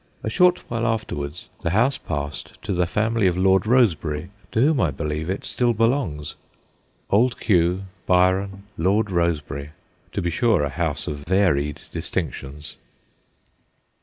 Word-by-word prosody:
A 110 - -2
short 180 +7 +3
while 115 0 -1
after 110 -1 -1
wards 70 +3 -6
the - - 0
house 120 +9 +2
passed 75 -2 -5
to - - -2
the 90 -1 +1
family 110 +1 +1
of 90 -1 +1
Lord 95 +2 +3
Rosebery, 90 - +2 0.2
to - - 0
whom, 140 +1 +4
I 85 - +3
believe, 75 +3 -3
it 95 - -3
still 120 -1 +1
belongs. 115 - 0 0.8
Old 120 +4 +3
Q., 90 -2 +2 0.2
Byron, 95 +2 +2 0.2
Lord 100 +5 +2
Rosebery 75 -4 -1 0.4
to - - -1
be 85 - -1
sure, 110 -2 +2
a 70 - 0
house 70 - -2
of 75 - -3
varied 75 -4 +1
distinctions. 75 +3 -5
90 Hz, 145 wpm, -23 LUFS, 75-110 Hz, 0.8 s, whom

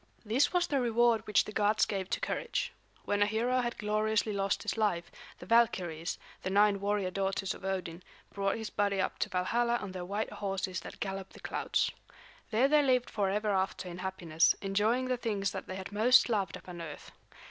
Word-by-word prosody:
This 240 +7 +2
was 355 -1 +2
the 275 -3 0
reward 235 -1 +2
which 210 - +3
the - - -7
gods 210 0 +3
gave 195 -2 -3
to - - -1
courage. 485 - -2 0.3
When 205 0 0
a 205 - +5
hero 235 +4 +1
had 240 -1 -3
gloriously 215 0 0
lost 195 0 0
his - - -2
life, 205 -6 0 0.3
the - - -11
Valkyries, 180 -7 +1 0.2
the 185 - -3
nine 200 +1 +4
warrior 200 -2 0
daughters 195 0 -1
of - - -13
Odin, 185 -3 -3 0.3
brought 195 +1 0
his 220 -1 -5
body 200 -1 +1
up - - -1
to - - 0
Valhalla 235 +6 +1
on 205 -5 -4
their 185 -1 -5
white 205 +4 -3
horses 190 -2 -3
that - - -10
gallop 195 -1 -4
the - - -13
clouds. - - 0 0.6
There 235 +4 +3
they 300 +1 +5
lived 255 -3 +2
forever 210 +1 0
after 190 -1 -1
in 175 0 -7
happiness, 175 -4 +2
enjoying 210 +6 +1
the 255 -1 0
things 205 -5 -1
that - - -6
they 185 - -5
had 190 +1 -7
most 235 +5 +5
loved 200 -7 0
upon 175 -1 -9
earth. 155 -3 -8
205 Hz, 195 wpm, -31 LUFS, 190-225 Hz, 0.6 s, a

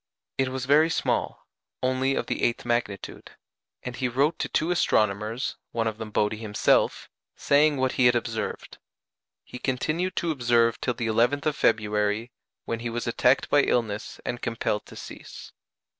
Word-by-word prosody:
It 135 -1 +2
was 130 -1 -4
very 150 +4 +5
small, - - -1 0.4
only 130 +1 +1
of - - -1
the - - -3
eighth 120 - 0
magnitude; 120 -5 -3 0.5
and 125 0 -5
he 130 - -1
wrote 140 +6 +1
to - - -2
two 160 +3 0
astronomers 110 - 0 0.2
(one 115 -1 0
of 110 -1 -3
them 110 -1 -5
Bode 105 0 +1
himself) 110 -1 +1 0.3
saying 145 +1 +3
what 130 0 +1
he 125 - +4
had 120 - +4
observed. 115 -2 -4 0.6
He 125 - -10
continued 155 +9 -1
to 170 -2 0
observe 120 -4 +2
till 125 - -1
the 120 - -3
11th 120 +6 +2
of 155 -1 +1
February, 105 0 +1 0.3
when 115 - -3
he 120 0 -3
was 120 +1 -3
attacked 125 +2 +2
by 145 - +4
illness 110 -6 -1
and 120 - -3
compelled 115 -2 -2
to - - -12
cease. - - -10
120 Hz, 165 wpm, -26 LUFS, 110-135 Hz, 0.6 s, very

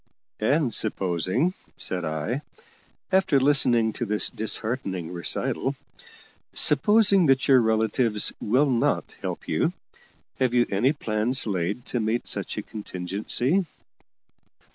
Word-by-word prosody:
"And 135 +3 +1
supposing," 95 - 0 0.2
said 90 -1 -1
I, 80 - -3 0.7
after 185 -7 +3
listening 125 -5 +3
to 120 - -4
this 105 +1 +3
disheartening 110 -6 -2
recital 85 -2 -1 0.8
"supposing 200 +4 +4
that 135 0 +2
your 130 -3 +6
relatives 110 0 +1
will 130 +6 +2
not 120 -2 0
help - - -5
you, - - 0 0.7
have 125 -2 +1
you 120 -1 +4
any 110 +8 +2
plans 120 -2 -1
laid 100 +3 -2
to 120 - -3
meet 110 +2 -1
such - - -3
a - - -3
contingency? 110 - -2
115 Hz, 115 wpm, -25 LUFS, 105-135 Hz, 0.8 s, your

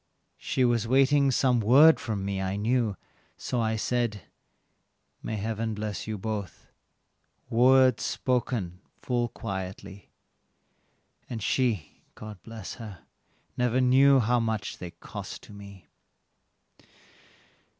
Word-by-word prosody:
She 130 - 0
was 120 -2 +1
waiting 135 +2 +4
some 125 -1 +2
word 140 +9 +6
from 105 -4 -3
me, 100 -1 -2
I 95 0 -2
knew, 110 0 0 0.4
so 125 - -2
I 110 0 0
said, 115 -2 -1 1.0
"May 110 - -4
Heaven 110 +1 -3
bless 105 -4 -5
you 110 -1 -3
both" 105 -1 -6 0.8
words 130 +1 +5
spoken 120 -8 -2 0.2
full 120 -1 0
quietly, 95 -1 -7 1.2
And 115 -4 -5
she, 115 - -1
God 105 -4 -10
bless 110 -3 -8
her, 100 -6 -10 0.5
never 125 0 +1
knew 135 +2 +5
how 120 +1 +2
much 110 -2 -3
they 90 - -6
cost 85 0 -9
to - - -13
me. 100 -2 -12
110 Hz, 115 wpm, -27 LUFS, 100-125 Hz, 1.2 s, word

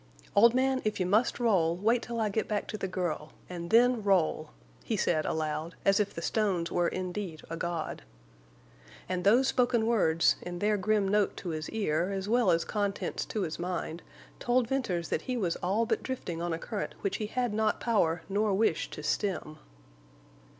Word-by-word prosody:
"Old 235 +4 +6
man, 260 0 +2
if 215 -1 -1
you 185 - +1
must 215 +8 +2
roll, 180 -8 +2
wait 225 +5 +2
till 235 0 -4
I 215 -1 +1
get 215 +2 -1
back 210 -1 -1
to - - -4
the 195 - -2
girl, 175 -5 -3
and 170 -1 -6
then 240 +2 +5
roll!" 175 -6 +1 0.3
he 220 - -1
said, 155 -5 +1
aloud, 155 +1 -2
as 195 +1 +4
if 205 -1 +1
the 170 - -7
stones 190 -6 0
were 175 -1 +2
indeed 185 -2 -4
a - - -2
god. 170 -1 -3 1.1
And 180 -1 -2
those 240 +7 +5
spoken 245 -3 +2
words, 165 -8 +3
in 175 0 -6
their 210 +3 +2
grim 205 0 +1
note 205 0 +1
to 180 - -5
his 155 -1 -4
ear, 180 -5 0
as 195 0 -3
well 235 -2 +3
as 165 -1 +2
contents 205 -2 -2
to 215 - -2
his 160 -1 -4
mind, 175 -1 -3 0.4
told 245 -1 +2
Venters 195 -11 -1
that - - 0
he 250 - 0
was 180 -7 0
all 200 +6 0
but 225 -1 0
drifting 180 -10 -4
on 175 0 -2
a 165 - -1
current 205 +5 -5
which 200 - -1
he 215 - -3
had 245 0 -1
not 215 0 +1
power 175 -8 +1
nor 205 0 +1
wish 200 -5 +1
to 150 - -8
stem. 165 -4 -2
195 Hz, 190 wpm, -30 LUFS, 170-220 Hz, 1.1 s, Old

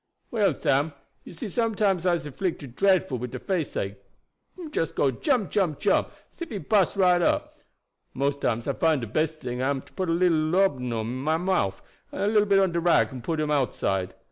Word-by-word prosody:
"Well, 215 -4 +2
Sam, 145 +3 +1 0.3
you - - -11
see 170 - -6
sometimes 205 -4 0
I'se 175 -4 +1
'flicted 145 -5 -4
dre'fful 185 -10 +2
wid 125 +1 -4
de - - -6
faceache 145 - -3 0.6
him 335 -4 -8
just 165 - -2
go 135 - +2
jump, 240 - 0
jump, 180 -8 +1
jump, - - +2 0.2
as - - -27
ef 340 - -4
he 215 - -4
bust 200 -1 +2
right 180 -2 +4
up. - - 0 0.6
Mose 140 +1 0
times 120 -3 -1
I 140 - +1
find 155 -1 +2
de - - -3
best 155 +7 -2
ting 125 0 -3
am 135 0 0
to - - -22
put 185 -2 -2
a - - +2
little 170 -1 +3
laudabun 155 -6 +1
in 115 +3 -4
my 155 +5 0
mouf, 175 - 0 0.3
and - - -3
a - - +2
little 205 -2 +4
on 190 - +1
bit 170 - -2
of 170 - -1
rag 175 -4 +3
and 130 -3 -8
put 160 +3 -2
him 150 -1 0
outside. 95 -9 0
165 Hz, 210 wpm, -26 LUFS, 135-190 Hz, 0.6 s, right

